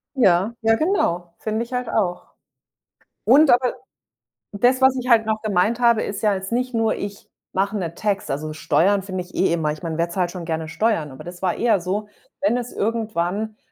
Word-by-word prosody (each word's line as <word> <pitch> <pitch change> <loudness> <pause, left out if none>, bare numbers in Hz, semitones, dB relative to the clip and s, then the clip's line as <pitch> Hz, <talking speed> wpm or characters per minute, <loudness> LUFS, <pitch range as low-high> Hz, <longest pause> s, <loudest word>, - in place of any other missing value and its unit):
Ja, 195 -3 +3
ja, 225 0 +4
genau, 180 - 0
finde 220 +1 -2
ich 235 - -12
halt 250 -1 -2
auch 180 -5 -2 0.9
und 280 +6 +6
aber 245 0 +3 0.8
das, 245 +6 +2
was 265 0 +5
ich 250 0 -3
halt 225 -2 +5
noch 220 0 -1
gemeint 215 +2 +1
habe, 235 -2 +4
ist 200 - -4
ja 210 -2 +3
jetzt 190 +1 -5
nicht 250 +2 -1
nur: 225 -1 +1
„Ich 200 0 -7 0.3
mache 200 +2 0
'n 170 -4 -4
Tax.“ 205 -1 -2
Also 155 +3 -3
Steuern 175 +6 +2
finde 185 -1 -4
ich 180 - -19
eh 190 - +2
immer 160 -3 0
ich 155 - -11
meine, 165 -2 -3
wer 170 +1 0
zahlt 175 0 -1
schon 175 -2 -7
gerne 160 -1 -3
Steuern, 170 -6 0
aber 130 - -10
das 175 0 -9
war 185 -2 0
eher 230 -4 +2
so, 200 +4 -2 0.3
wenn 205 +4 +2
es 245 0 -5
irgendwann 215 -1 -2
205 Hz, 200 wpm, -22 LUFS, 175-230 Hz, 0.9 s, und